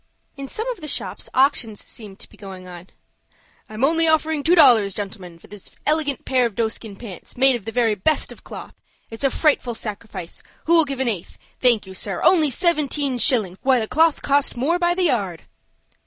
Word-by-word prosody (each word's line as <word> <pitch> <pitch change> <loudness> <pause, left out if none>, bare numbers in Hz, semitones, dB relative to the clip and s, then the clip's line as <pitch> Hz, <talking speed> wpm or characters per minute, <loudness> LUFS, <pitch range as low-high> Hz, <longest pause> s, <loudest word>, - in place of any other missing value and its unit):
In 275 -1 -7
some 445 - -4
of 465 - -9
the 305 - -6
shops - - -4
auctions 250 -5 +1
seemed 205 -4 -8
to - - -11
be - - -18
going 190 -2 -10
on. 175 0 -11 0.8
"I 215 - -10
am 225 - -3
only 325 +3 +3
offered 315 -1 +1
two 340 +4 +4
dollars, 235 - +5
gentlemen, 190 -4 -7
for - - -19
this 205 -2 -11 0.2
elegant 300 -2 0
pair 255 -2 +2
of 220 - -12
doeskin 220 -2 -3
pants, 195 -2 -11
made 265 0 +4
of 235 - -7
the 225 - -4
very 230 -2 +2
best 255 +10 0
of - - -14
cloth. - - -10 0.4
It's 225 +4 -7
a 275 - +4
frightful 265 -5 +1
sacrifice. 205 -5 -7 0.2
Who'll 330 -1 +4
give 275 -2 -4
an 260 - 0
eighth? 200 -7 -4 0.2
Thank 240 -5 +3
you, 190 - -10
sir. 190 0 -4
Only 320 -5 +5
seventeen 285 -3 0
shillings! 205 -8 +2
Why 260 -2 +3
the 220 - -3
cloth 320 +3 +2
cost 280 -2 +1
more 320 +8 0
by 350 0 +1
the 370 - 0
yard!" 200 - -1
250 Hz, 200 wpm, -21 LUFS, 205-300 Hz, 0.8 s, dollars